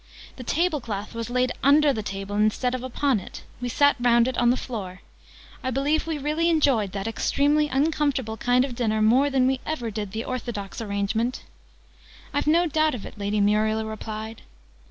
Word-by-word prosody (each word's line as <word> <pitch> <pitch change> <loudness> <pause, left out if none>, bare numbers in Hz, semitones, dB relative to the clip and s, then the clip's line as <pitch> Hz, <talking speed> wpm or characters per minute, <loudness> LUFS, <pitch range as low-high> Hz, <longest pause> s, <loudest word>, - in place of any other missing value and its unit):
The 255 - -7
table 315 +2 0
cloth 210 -2 -5
was 230 0 -5
laid 250 0 +1
under 285 +1 +5
the 220 - -3
table, 195 0 -5
instead 215 +4 +1
of 255 - -3
upon 260 -1 0
it: - - -10 0.2
we 245 - -2
sat 285 +4 +3
round 240 -1 +4
it 260 - -2
on 240 0 +3
the 250 - +3
floor: 220 -9 -5
and 185 +1 -13 0.6
I 260 - -1
believe 285 +5 0
we 320 -2 -1
really 305 +4 0
enjoyed 275 - +2
that 195 -1 -4
extremely 290 +6 +1
uncomfortable 280 -4 0
kind 250 +3 +2
of 265 - -6
dinner 220 -3 0
more 255 +6 +4
than 265 -2 +2
we 260 0 +1
ever 245 -8 -3
did 205 -2 -4
the 220 +2 -4
orthodox 235 -5 -5
arrangement!" 220 +3 -2 0.9
"I've 285 - -1
no 335 +3 +4
doubt 310 -2 +1
of 220 - -7
it," - - -11
Lady 205 +1 -1
Muriel 215 +2 +2
replied. 220 0 -6
245 Hz, 190 wpm, -25 LUFS, 215-285 Hz, 0.9 s, under